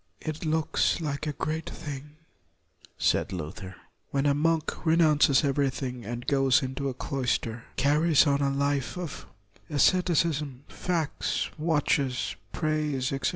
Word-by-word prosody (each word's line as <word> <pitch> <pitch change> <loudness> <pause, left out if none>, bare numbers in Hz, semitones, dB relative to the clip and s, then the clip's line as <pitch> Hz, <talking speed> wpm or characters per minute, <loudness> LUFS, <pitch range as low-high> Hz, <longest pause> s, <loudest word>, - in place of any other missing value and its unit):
" - - -43
It 155 - -9
looks 160 +2 +1
like 150 -1 -3
a - - 0
great 160 +2 -3
thing,' 145 -1 -7
1 - - -26 0.8
said - - +1
Luther, 90 +2 -6 0.2
" - - -46
when 140 0 0
a 145 - +4
monk 160 +2 0
renounces 155 -4 +4
everything 135 -4 -1
and 120 +2 -5
goes 135 0 +3
into 135 +1 -2
a 130 - -5
cloister, 120 -4 -2
carries 150 +3 +4
on 140 -1 +2
a 140 - +2
life 140 +2 -1
of 175 -5 -6 0.4
asceti 175 +4 +3
cism, 150 -5 0
fasts, 170 -4 -2
watches, 145 -5 +1 0.2
prays, 150 -4 -1
etc. 135 - 0
145 Hz, 145 wpm, -28 LUFS, 135-155 Hz, 0.8 s, a